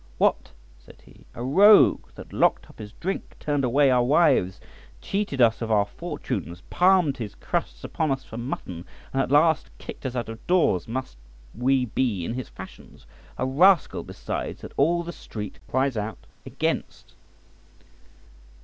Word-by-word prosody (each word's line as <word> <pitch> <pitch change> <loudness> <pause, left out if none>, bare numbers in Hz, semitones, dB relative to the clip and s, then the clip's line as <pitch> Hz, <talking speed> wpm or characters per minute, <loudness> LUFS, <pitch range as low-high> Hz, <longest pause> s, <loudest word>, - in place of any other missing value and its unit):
"What!" - - +1 0.3
said 60 - -18
he, - - -19
"a 120 - -5
rogue 200 +11 +6
that - - -11
locked - - +1
up - - -23
his 105 -1 -8
drink, 190 +3 -5
turned 145 -2 -1
away 135 +2 +3
our 125 -1 +4
wives, 135 - +3 0.4
cheated 195 -9 -3
us 115 -2 +4
of 115 - -3
our 105 -2 +3
fortunes, 145 - -6
palmed 180 -6 +3
his 110 -5 -6
crusts - - -4
upon 155 - -2
us 135 -1 -1
for 110 - -10
mutton, 105 -8 -5 0.3
and 135 - +2
at - - -2
last 155 +3 +3
kicked - - -7
us 130 - -6
out 120 -2 -2
of 115 0 -10
doors; 155 - +2
must 120 - -5 0.4
we 130 +2 +1
be 110 -6 -1
in 115 - -3
his 130 -1 -5
fashions? 95 0 -13 0.3
A - - -1
rascal, 170 +6 +3
besides, - - -6
that - - -10
all 170 +5 +2
the 170 0 -7
street 105 -9 -8
cries 130 0 +1
out 105 -2 -5 0.2
against." - - -3
130 Hz, 160 wpm, -25 LUFS, 110-155 Hz, 0.4 s, rogue